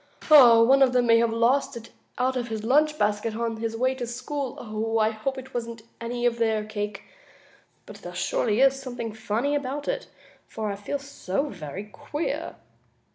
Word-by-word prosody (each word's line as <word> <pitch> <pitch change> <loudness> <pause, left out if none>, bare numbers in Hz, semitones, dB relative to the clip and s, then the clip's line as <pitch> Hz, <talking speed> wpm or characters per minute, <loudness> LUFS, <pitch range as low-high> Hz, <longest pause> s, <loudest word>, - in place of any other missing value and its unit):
One 255 -2 +8
of 260 -2 +5
them 250 -1 +3
may 230 -1 +5
have 235 0 +2
lost 235 +3 +1
it 230 -1 -11 0.3
out 255 +1 +1
of 245 -2 -2
his 220 -2 -4
lunch 300 +6 +3
basket 210 0 0
on 230 0 -2
his 225 0 -3
way 255 +2 +1
to 250 -2 -5
school. 240 -3 -3
I 215 0 +3
hope 225 +5 -4
it 260 0 -9
wasn't 230 -2 -5 0.2
any 240 +1 -3
of 235 -1 +1
their 220 -2 +1
cake. 210 -2 -5 0.8
But 210 - -11
there 175 -3 -9
is - - -7
surely 220 +7 +3
something 250 -4 -6
funny 220 +6 -1
about 285 0 -3
it, - - -2 0.4
for 215 -2 -4
I - - -4
feel 205 +8 -4
so 275 -2 -3
very 180 0 -7
queer!" 215 - -5
235 Hz, 180 wpm, -25 LUFS, 215-260 Hz, 0.8 s, One